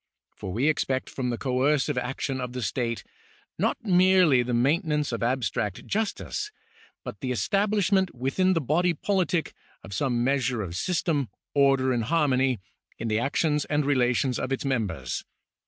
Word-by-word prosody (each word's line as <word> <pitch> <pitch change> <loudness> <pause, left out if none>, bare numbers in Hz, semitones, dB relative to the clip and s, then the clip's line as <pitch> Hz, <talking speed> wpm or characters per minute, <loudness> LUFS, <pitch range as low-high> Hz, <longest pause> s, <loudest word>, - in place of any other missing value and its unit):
For 95 - -6
we 120 +10 +1
expect 135 -3 0
from 125 -2 -2
the 120 - -2
coercive 135 +3 +1
action 130 +1 -2
of 125 -1 -5
the 125 -1 -4
state 115 0 -2 0.6
not - - +1
merely 185 - +5
the 120 0 -3
maintenance 150 - +1
of 115 -2 -3
abstract 115 -5 -1
justice, 225 - -2 0.5
but - - -7
the 130 -4 -3
establishment 195 - +1
within 135 +10 +1
the 165 - +1
body 170 +6 +1
politic 180 -1 0 0.3
of 95 - -9
some 120 +4 0
measure 130 -3 +1
of 85 -3 -6
system, 155 - 0 0.2
order, 135 -2 +3
and 115 -2 0
harmony, 135 -4 +2 0.4
in 115 - -3
the 110 0 +1
actions 150 +3 +1
and 150 -1 0
relations 125 -2 +2
of 130 - -3
its 135 - -2
members. 95 - -2
135 Hz, 155 wpm, -26 LUFS, 120-160 Hz, 0.6 s, merely